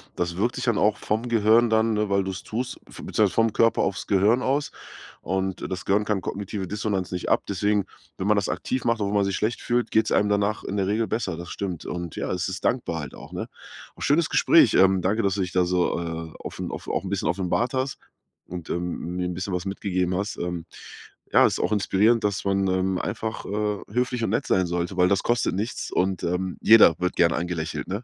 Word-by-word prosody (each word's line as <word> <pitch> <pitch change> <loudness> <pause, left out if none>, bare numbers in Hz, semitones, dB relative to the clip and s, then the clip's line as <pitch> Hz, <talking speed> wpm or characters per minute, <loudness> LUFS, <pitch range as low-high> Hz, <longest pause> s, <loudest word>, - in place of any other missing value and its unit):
das 85 0 -2
wirkt 115 +6 0
sich 130 - -4
dann 115 -4 +2
auch 105 0 +3
vom 110 +3 -2
Gehirn 115 +1 +4
dann, 110 0 +2
ne, 105 -1 0
weil 100 0 +2
du's 95 -1 -5
tust 125 +3 -4
f - - -14
beziehungsweise 105 -3 +1
vom 115 -1 +2
Körper 115 0 +3
aufs - - -2
Gehirn 105 +6 +3
aus. 140 +3 0 0.5
Und 95 +1 -2
das 90 -1 -4
Gehirn 100 +2 +2
kann 105 -2 0
kognitive 100 0 -4
Dissonanz 105 -2 -2
nicht 90 -1 -3
ab. - - +3
Deswegen, 100 0 +1 0.3
wenn 95 - -2
man 105 - +4
das 100 - 0
aktiv 130 - -2
macht, 115 -1 +2
obwohl 100 0 -1
man 100 -1 +3
sich 100 -1 -1
schlecht 110 +3 -1
fühlt, 120 0 0
geht's 110 0 +2
einem 105 - +3
danach 105 +1 0
in 100 - -4
der 95 -1 0
Regel 110 +2 0
besser, 110 -7 -2
das 85 +1 -8
stimmt. 95 -5 -5
Und 85 -2 -5
ja, - - -3
es 90 0 -1
ist 95 - -6
dankbar 115 -10 0
halt 70 - -8
auch, - - -12
ne? - - -4 0.5
Auch - - -15
schönes 155 +3 +2
Gespräch. - - +5
Ähm, 95 0 +5
danke, 100 +5 +1
dass 100 -2 +1
du 100 - -1
dich 90 -1 -2
da 90 - +3
so, 90 0 +1
äh, 80 -1 -5
offen - - -6
auf - - -7
auch - - -1
'n 95 - -5
bisschen 100 0 -1
offenbart 100 +7 0
hast 130 +1 -1 0.5
und, 90 -2 -7
ähm, 90 0 -3
mir 90 0 -1
'n 90 - -3
bisschen 95 +2 -4
was 90 +1 -2
mitgegeben 95 -2 -1
hast. 100 +1 -3
Ähm, 85 -1 -4 0.7
ja, - - +6
ist - - +1
auch - - 0
inspirierend, 105 +3 +3
dass 100 -2 -1
man, 95 0 +1
ähm, 95 0 0
einfach, 110 +2 -4
äh, 105 0 -1
höflich 125 +1 -1
und - - -2
nett 115 - 0
sein 95 -1 +2
sollte, 85 +2 -2
weil 90 0 +5
das 100 +1 +1
kostet 120 -5 +1
nichts 105 +5 -3
und, 95 0 0
ähm, 90 +1 -2
jeder 110 -7 +7
wird 90 0 -1
gern 85 -1 +4
angelächelt, 85 -2 -3
ne? 100 +6 -4
100 Hz, 230 wpm, -25 LUFS, 90-110 Hz, 0.7 s, jeder